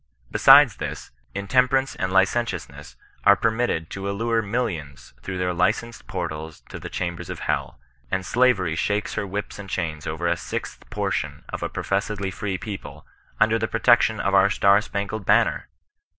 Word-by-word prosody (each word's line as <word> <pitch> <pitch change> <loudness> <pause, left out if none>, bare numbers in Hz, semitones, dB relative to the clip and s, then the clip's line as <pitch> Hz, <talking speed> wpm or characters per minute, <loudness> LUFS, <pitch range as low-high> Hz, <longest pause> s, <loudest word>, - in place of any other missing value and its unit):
Besides - - +7
this, - - -6 0.2
intemperance 130 +6 +2
and 95 0 -2
licentiousness 95 -1 0 0.3
are 100 - +7
permitted 110 -8 0
to 95 0 -4
allure 115 +3 0
millions 80 - -4
through 95 +6 -5
their 90 0 0
licensed 110 +6 -1
portals 80 0 -5
to - - -7
the - - -7
chambers 85 -2 -4
of - - -6
hell; - - -2 0.3
and 95 0 -1
Sla 125 +6 +4
very 90 -5 -2
shakes 105 +5 -1
her 100 - -2
whips 100 +2 -5
and 100 -1 -8
chains 80 -4 -3
over 80 +2 -3
a 85 0 +2
sixth 85 - -6
portion - - -2
of - - -5
a - - -2
professedly 100 0 -2
free 95 +1 -3
people, 100 0 -8 0.3
under 110 +1 +3
the 110 - 0
protection 115 -1 +3
of 100 - 0
our 100 0 +5
star 100 +1 +4
spangled 100 0 -4
banner! - - +2
100 Hz, 165 wpm, -24 LUFS, 90-110 Hz, 0.3 s, Besides